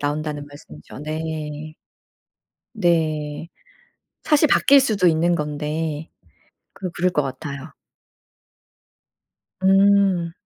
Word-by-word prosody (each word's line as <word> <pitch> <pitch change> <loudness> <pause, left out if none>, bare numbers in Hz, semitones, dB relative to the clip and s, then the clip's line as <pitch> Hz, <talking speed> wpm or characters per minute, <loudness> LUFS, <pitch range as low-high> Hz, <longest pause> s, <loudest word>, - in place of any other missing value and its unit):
나온다는 145 0 -3
말씀이죠. 130 - -13
네. 155 0 -5 1.0
네. 160 -5 -1 0.8
사실 300 0 +4
바뀔 280 0 +5
수도 215 -9 +2
있는 170 +1 +2
건데. 150 +1 -3 0.6
그 185 - -5
그럴 180 +2 0
것 150 - +1
같아요. 140 +2 -7 1.9
음. 195 -3 +4
160 Hz, 160 characters per minute, -22 LUFS, 150-180 Hz, 1.9 s, 바뀔